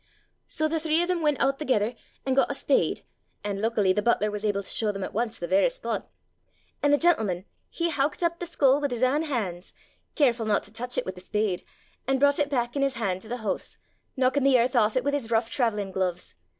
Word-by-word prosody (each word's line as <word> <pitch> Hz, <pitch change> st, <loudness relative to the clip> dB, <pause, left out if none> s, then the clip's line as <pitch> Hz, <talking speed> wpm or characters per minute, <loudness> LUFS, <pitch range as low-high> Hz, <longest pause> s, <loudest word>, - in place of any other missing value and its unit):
"So 310 Hz, -, 0 dB
the 325 Hz, +1 st, -1 dB
three 320 Hz, +2 st, +2 dB
of -, -, -2 dB
them 360 Hz, -2 st, 0 dB
went 300 Hz, -3 st, +1 dB
oot 275 Hz, 0 st, +1 dB
thegither, 245 Hz, -6 st, +1 dB, 0.3 s
an' 265 Hz, -, +1 dB
got 270 Hz, -, +3 dB
a 280 Hz, -, -2 dB
spade; 275 Hz, -, +1 dB, 0.4 s
an' 200 Hz, -1 st, -3 dB
luckily 215 Hz, -4 st, +2 dB
the 210 Hz, -, 0 dB
butler 210 Hz, -1 st, +2 dB
was 210 Hz, 0 st, -5 dB
able 205 Hz, -2 st, 0 dB
to -, -, -8 dB
show 215 Hz, -2 st, 0 dB
them 195 Hz, -1 st, -5 dB
at -, -, -5 dB
once 225 Hz, +1 st, -1 dB
the 175 Hz, -, -4 dB
varra 295 Hz, -, +4 dB
spot. -, -, -4 dB, 0.7 s
An' 290 Hz, -, +3 dB
the 290 Hz, -, +5 dB
gentleman 220 Hz, -, +1 dB, 0.2 s
he 340 Hz, 0 st, -1 dB
howkit 290 Hz, +3 st, 0 dB
up 340 Hz, 0 st, 0 dB
the 350 Hz, -, -4 dB
skull 285 Hz, -4 st, +3 dB
wi' 285 Hz, -, +1 dB
his 245 Hz, -1 st, -2 dB
ain 270 Hz, +4 st, +3 dB
han's, 210 Hz, -, -3 dB, 0.4 s
carefu' 240 Hz, -6 st, +2 dB
not 210 Hz, -1 st, +2 dB
to 205 Hz, -, -11 dB
touch 245 Hz, +2 st, -5 dB
it -, -, 0 dB
with 185 Hz, -, -4 dB
the 180 Hz, -, -12 dB
spade, 200 Hz, -1 st, -1 dB, 0.4 s
an' 270 Hz, 0 st, +2 dB
broucht 285 Hz, +1 st, +4 dB
it 290 Hz, -1 st, +1 dB
back 240 Hz, -3 st, -1 dB
in 280 Hz, -, 0 dB
his 275 Hz, -1 st, +1 dB
han' 195 Hz, -5 st, -1 dB
to 215 Hz, -, -13 dB
the 235 Hz, -1 st, -5 dB
hoose, 200 Hz, -, -3 dB, 0.4 s
knockin' 260 Hz, +2 st, +2 dB
the 270 Hz, -2 st, +5 dB
earth 245 Hz, +2 st, +1 dB
aff 215 Hz, -2 st, +3 dB
it 255 Hz, -, +1 dB
wi' 285 Hz, -, +1 dB
his 280 Hz, -6 st, -2 dB
rouch 225 Hz, 0 st, 0 dB
traivellin' 210 Hz, -7 st, 0 dB
gluves. 185 Hz, -2 st, -2 dB
245 Hz, 240 wpm, -26 LUFS, 210-285 Hz, 0.7 s, the